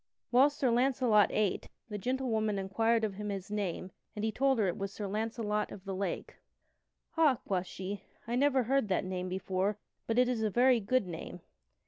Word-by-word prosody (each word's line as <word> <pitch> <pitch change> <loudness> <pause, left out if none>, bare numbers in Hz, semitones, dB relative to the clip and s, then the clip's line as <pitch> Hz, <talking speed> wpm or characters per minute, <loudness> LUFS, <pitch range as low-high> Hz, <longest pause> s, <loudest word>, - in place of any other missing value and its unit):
Whilst 275 +4 +5
Sir 255 -3 +2
Launcelot 240 -4 +4
ate, 210 -3 0 0.2
the 210 -2 -5
gentlewoman 220 -3 0
inquired 225 +4 +1
of 210 -2 0
him 210 +2 -5
his 195 0 -5
name 190 -3 -3 0.2
and 210 +1 -2
he 220 - 0
told 270 +3 +2
her 210 -3 +2
it 175 - -1
was 195 0 -4
Sir 205 - -5
Launcelot 210 0 -2
of 195 - -10
the 195 - -3
Lake. 195 +1 -4 0.7
"Ha!" 315 -5 +4
quoth 185 -2 -1
she, 190 +2 -5 0.3
"I 235 - -1
never 270 0 +3
heard 270 0 +1
that 185 -2 0
name 185 0 -3
before, 190 +2 -1 0.3
but 225 - 0
it 250 0 +5
is 245 -3 -1
a 215 - +1
very 245 +3 +4
good 225 +2 +1
name." 175 0 -7
210 Hz, 190 wpm, -32 LUFS, 195-245 Hz, 0.7 s, Whilst